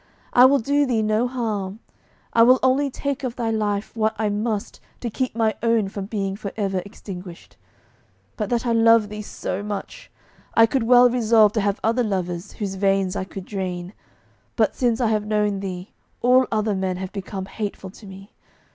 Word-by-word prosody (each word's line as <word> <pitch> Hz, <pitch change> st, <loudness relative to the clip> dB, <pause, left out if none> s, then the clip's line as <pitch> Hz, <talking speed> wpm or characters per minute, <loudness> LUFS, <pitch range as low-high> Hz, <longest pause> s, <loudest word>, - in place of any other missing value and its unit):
I 245 Hz, -, +8 dB
will 275 Hz, +2 st, +6 dB
do 285 Hz, +3 st, +1 dB
thee 225 Hz, -3 st, +1 dB
no 215 Hz, +3 st, +1 dB
harm; 215 Hz, -5 st, -3 dB, 0.5 s
I 230 Hz, -, +5 dB
will 250 Hz, +3 st, +7 dB
only 270 Hz, +2 st, +3 dB
take 280 Hz, +1 st, -4 dB
of 250 Hz, -2 st, -3 dB
thy 230 Hz, -2 st, -1 dB
life 210 Hz, -1 st, -2 dB
what 220 Hz, -1 st, 0 dB
I 215 Hz, -1 st, 0 dB
must 210 Hz, 0 st, -3 dB, 0.2 s
to 235 Hz, -, -4 dB
keep 255 Hz, +2 st, -2 dB
my 225 Hz, -1 st, +2 dB
own 230 Hz, -3 st, +2 dB
from 195 Hz, -1 st, -6 dB
being 195 Hz, -3 st, -2 dB
for 200 Hz, -1 st, -6 dB
ever 195 Hz, -3 st, -1 dB
extinguished. 185 Hz, -3 st, -10 dB, 0.8 s
But 210 Hz, -2 st, -3 dB
that 240 Hz, 0 st, 0 dB
I 235 Hz, -, +1 dB
love 230 Hz, -2 st, +5 dB
thee 210 Hz, 0 st, -6 dB
so 200 Hz, -2 st, -5 dB
much, 210 Hz, -, -6 dB, 0.5 s
I 225 Hz, -, +7 dB
could 260 Hz, +3 st, 0 dB
well 245 Hz, 0 st, +7 dB
resolve 225 Hz, -3 st, +4 dB
to 220 Hz, -, +1 dB
have 200 Hz, 0 st, 0 dB
other 230 Hz, +3 st, +2 dB
lovers 185 Hz, -3 st, -3 dB
whose 200 Hz, -3 st, -4 dB
veins 195 Hz, 0 st, +1 dB
I 190 Hz, -, -2 dB
could 190 Hz, -1 st, -8 dB
drain; 185 Hz, -2 st, -4 dB, 0.6 s
but -, -, +2 dB
since 240 Hz, -4 st, +1 dB
I 240 Hz, -3 st, +2 dB
have 210 Hz, -1 st, 0 dB
known 210 Hz, -2 st, +1 dB
thee 185 Hz, -1 st, -6 dB, 0.3 s
all 255 Hz, +1 st, +5 dB
other 215 Hz, -1 st, +1 dB
men 190 Hz, -1 st, -2 dB
have 190 Hz, 0 st, -5 dB
become 195 Hz, -1 st, -5 dB
hateful 200 Hz, -2 st, -6 dB
to 210 Hz, +1 st, -14 dB
me.... 195 Hz, +1 st, -12 dB
215 Hz, 190 wpm, -23 LUFS, 195-235 Hz, 0.8 s, I